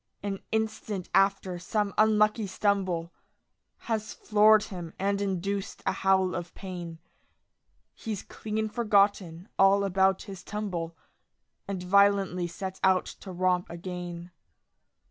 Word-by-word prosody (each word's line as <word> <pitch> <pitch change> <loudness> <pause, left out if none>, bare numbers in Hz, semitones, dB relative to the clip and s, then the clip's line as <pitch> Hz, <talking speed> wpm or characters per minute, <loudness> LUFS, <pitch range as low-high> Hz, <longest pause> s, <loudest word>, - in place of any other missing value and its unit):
An 200 -1 -3
instant 220 -3 -2
after 195 -2 +2
some 205 +3 -1
unlucky 215 0 +3
stumble 190 -4 0 0.7
Has 220 -2 -2
floored 215 0 +5
him 175 -4 -7
and 200 +1 0
induced 195 0 -3
a - - +2
howl 190 -1 +2
of 175 0 -5
pain, 175 -4 -7 1.0
He's 215 -4 -5
clean 220 0 -3
forgotten 200 -5 +1
all 195 +1 +5
about 190 0 +2
his 195 -3 -9
tumble 175 -6 -4 0.7
And 190 -2 -4
violently 195 -2 +3
sets 185 +2 -6
out 190 -1 +4 0.2
to 190 - -8
romp 180 0 +1
again. 175 0 -6
195 Hz, 115 wpm, -28 LUFS, 180-205 Hz, 1.0 s, floored